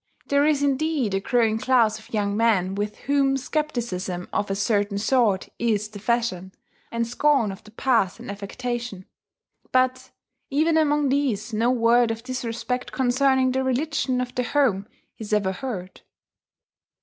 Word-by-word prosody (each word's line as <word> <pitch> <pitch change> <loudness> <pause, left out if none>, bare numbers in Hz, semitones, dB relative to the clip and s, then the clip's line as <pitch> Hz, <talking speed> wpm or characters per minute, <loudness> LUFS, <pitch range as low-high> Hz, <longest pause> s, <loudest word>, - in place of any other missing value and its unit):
There 285 +1 +3
is 290 -2 +2
indeed 280 -5 0
a 195 - +1
growing 225 +1 +1
class 230 -4 +3
of 220 - -18
young 205 -2 0
men 210 -5 +2
with 205 +1 -3
whom 275 -1 +2
scepticism 235 - -3
of 205 - -1
a 195 - -1
certain 205 0 0
sort 215 -3 +1
is 215 -3 0
the 210 -1 -10
fashion, 205 -5 -1 0.4
and 230 0 -1
scorn 245 -2 +2
of 195 +3 -10
the - - -15
past 225 -4 +1
an - - -10
affectation, 235 0 -5 0.7
but 255 0 +1 0.4
even 315 +4 +2
among 295 -2 +2
these 245 -6 0
no 225 +3 +2
word 240 -1 +3
of 225 0 -4
disrespect 250 0 -3
concerning 260 0 +2
the 265 +1 0
religion 260 0 0
of 245 0 -4
the 250 - 0
home 240 -7 +1 0.3
is 215 -1 -5
ever 200 -3 +2
heard. 190 -3 -6
235 Hz, 150 wpm, -24 LUFS, 205-265 Hz, 0.7 s, There